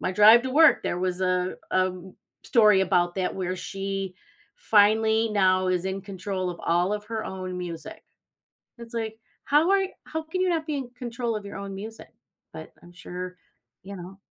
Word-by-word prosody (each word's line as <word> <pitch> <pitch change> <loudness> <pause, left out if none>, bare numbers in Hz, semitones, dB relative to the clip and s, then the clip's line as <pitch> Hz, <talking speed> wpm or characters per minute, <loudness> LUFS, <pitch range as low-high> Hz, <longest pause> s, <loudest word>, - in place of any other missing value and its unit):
my 185 - -1
drive 215 +4 +7
to 260 - -3
work, 315 +4 +6
there 175 - -1
was 185 0 -1
a 185 0 0 0.2
a 185 0 +2 0.5
story 215 -6 +5
about 175 -2 +2
that 185 -1 -1
where 185 -1 -2
she 195 0 -4 0.4
finally 220 - +3
now 185 -2 +3
is 180 0 0
in 190 +1 -3
control 190 -1 -4
of 170 - -8
all 175 +3 +2
of 210 0 -3
her 220 0 -4
own 185 -1 -5
music. 170 -3 -7 0.8
It's 235 0 -11
like, 220 -1 -3 0.3
how 305 +6 +3
are 390 -1 +4 0.2
how 320 0 -4
can 345 +4 -4
you 370 - +2
not 325 -3 0
be 300 -3 -2
in 265 -3 -4
control 235 -2 -3
of 210 - -6
your 200 -1 -7
own 195 0 -6
music? 220 +3 -8 0.4
But - - -10
I'm 175 - -15
sure 180 +2 -7 0.5
you 200 - -8
know? 185 +2 -10
195 Hz, 185 wpm, -26 LUFS, 185-225 Hz, 0.8 s, drive